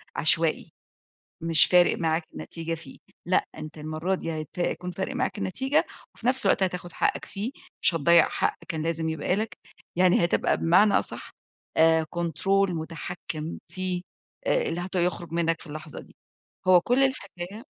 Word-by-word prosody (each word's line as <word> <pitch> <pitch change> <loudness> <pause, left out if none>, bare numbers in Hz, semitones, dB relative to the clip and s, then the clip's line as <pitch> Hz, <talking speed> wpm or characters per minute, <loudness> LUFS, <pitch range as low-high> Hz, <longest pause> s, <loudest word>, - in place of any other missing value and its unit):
عشوائي، 160 +1 +2 0.7
مش 165 -2 +5
فارق 180 -1 +5
معاك 165 0 +1
النتيجة 165 - -5
فيه 160 -4 -11 0.3
لأ، 185 - +2
أنت 155 0 -8
المَرّة 155 +5 -2
دي 165 -3 -4
هيت 155 -2 -5
هيكون 180 0 -2
فارق 190 +8 -4
معاك 255 -4 -1
النتيجة، 265 - +1 0.3
وفي 230 - -8
نفس 260 +1 +3
الوقت - - +3
هتاخُد 180 -2 -2
حقك - - 0
فيه، 210 +6 -5 0.3
مش - - +4
هتضيَّع 170 +2 +5
حق - - 0
كان 160 -2 -3
لازم 165 0 -1
يبقى 160 +3 0
لك، 220 +2 -3 0.4
يعني 180 -1 +4
هتبقى 170 - +2
بمعنى 195 +5 +4
أصحّ، - - -2 0.5
آآ، 160 0 +5
كنترول 180 +3 +1
مُتحكم 160 0 -5
فيه، 180 +1 -3 0.4
آآ - - +3
اللي 165 +1 -2
هت 185 +2 -6
يخرج 175 -1 0
منك 165 -1 +1
في - - -12
اللحظة 155 0 -7
دي، - - -18 0.5
هو 180 -1 +8
كُلّ 245 +8 +1
الحكاية 205 -5 -3
175 Hz, 160 wpm, -26 LUFS, 160-185 Hz, 0.7 s, هو